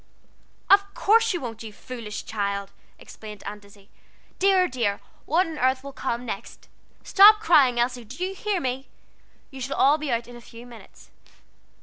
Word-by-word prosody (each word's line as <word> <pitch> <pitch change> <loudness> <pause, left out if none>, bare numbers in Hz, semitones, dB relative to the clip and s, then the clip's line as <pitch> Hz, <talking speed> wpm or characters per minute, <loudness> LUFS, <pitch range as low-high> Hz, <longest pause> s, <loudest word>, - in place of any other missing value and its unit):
"Of 400 0 +4
course 455 +2 +3
you 355 - -2
won't, 225 -3 -7
you 220 -1 -8
foolish 225 -1 -8
child," 200 -2 -3 0.3
exclaimed 210 -2 -12
Aunt 205 +1 -7
Izzie. 200 0 -20 0.5
"Dear, 380 -1 +4
dear, 230 -7 -2 0.3
what 340 +6 +2
on 320 -2 -7
earth 260 +1 +1
will 280 0 -9
come 245 -2 -4
next? 205 -4 -8 0.3
Stop 420 +2 +7
crying, 275 - +4
Elsie 245 0 -1
do 270 - -5
you 380 - -4
hear 400 0 -2
me? 260 -2 -4 0.6
You 270 -1 -10
shall 265 +2 -4
all 290 +3 +4
be 305 - -5
got 240 -3 +1
out 235 - -12
in 245 - -12
a 240 - -12
few 235 +1 -13
minutes." 240 -2 -16
255 Hz, 180 wpm, -24 LUFS, 225-350 Hz, 0.6 s, Stop